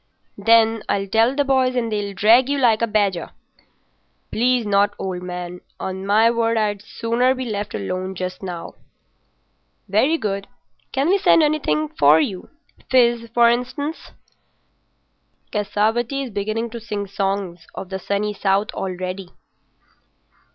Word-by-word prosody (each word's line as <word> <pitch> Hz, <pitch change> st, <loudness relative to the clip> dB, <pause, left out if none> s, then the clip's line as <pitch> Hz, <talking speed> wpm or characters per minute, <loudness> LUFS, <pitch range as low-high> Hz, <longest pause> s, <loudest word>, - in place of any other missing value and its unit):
"Then, 225 Hz, +1 st, +4 dB
I'll 195 Hz, 0 st, 0 dB
tell 225 Hz, +6 st, +2 dB
the 285 Hz, -, +2 dB
boys 260 Hz, -2 st, +2 dB
and 230 Hz, -2 st, -1 dB
they'll 205 Hz, -2 st, -3 dB
drag 230 Hz, +7 st, +5 dB
you 285 Hz, -, +1 dB
like 235 Hz, -5 st, +3 dB
a 230 Hz, -, +2 dB
badger." 200 Hz, -5 st, 0 dB, 1.0 s
"Please 245 Hz, 0 st, +1 dB
not, 205 Hz, 0 st, +2 dB
old 185 Hz, -2 st, -4 dB
man. 180 Hz, 0 st, -6 dB, 0.2 s
On 190 Hz, +1 st, -5 dB
my 220 Hz, +3 st, +4 dB
word, 230 Hz, -1 st, +1 dB
I'd 205 Hz, -2 st, 0 dB
sooner 235 Hz, +4 st, 0 dB
be 260 Hz, 0 st, -4 dB
left 210 Hz, -3 st, -4 dB
alone 185 Hz, -, -4 dB
just 185 Hz, 0 st, -5 dB
now." 180 Hz, -3 st, -6 dB, 1.1 s
"Very 240 Hz, +11 st, +2 dB
good. 200 Hz, -5 st, -3 dB, 0.4 s
Can 275 Hz, +2 st, 0 dB
we 395 Hz, +2 st, +3 dB
send 330 Hz, -, +5 dB
anything 155 Hz, -, 0 dB
in -, -, -33 dB
to 145 Hz, +2 st, +7 dB
you? 185 Hz, +3 st, -3 dB, 0.4 s
Fizz, 235 Hz, -2 st, +3 dB
for 235 Hz, -1 st, +6 dB
instance. 255 Hz, +6 st, -2 dB, 1.4 s
Cassavetti 220 Hz, +6 st, 0 dB
is 260 Hz, -, -6 dB
beginning 215 Hz, +3 st, -2 dB
to 235 Hz, -, -6 dB
sing 210 Hz, -2 st, -4 dB
songs 195 Hz, -4 st, -3 dB
of 190 Hz, -, -7 dB
the 190 Hz, 0 st, -4 dB
Sunny 200 Hz, +3 st, -2 dB
South 200 Hz, +1 st, 0 dB
already." 185 Hz, 0 st, -5 dB
210 Hz, 145 wpm, -21 LUFS, 195-235 Hz, 1.4 s, to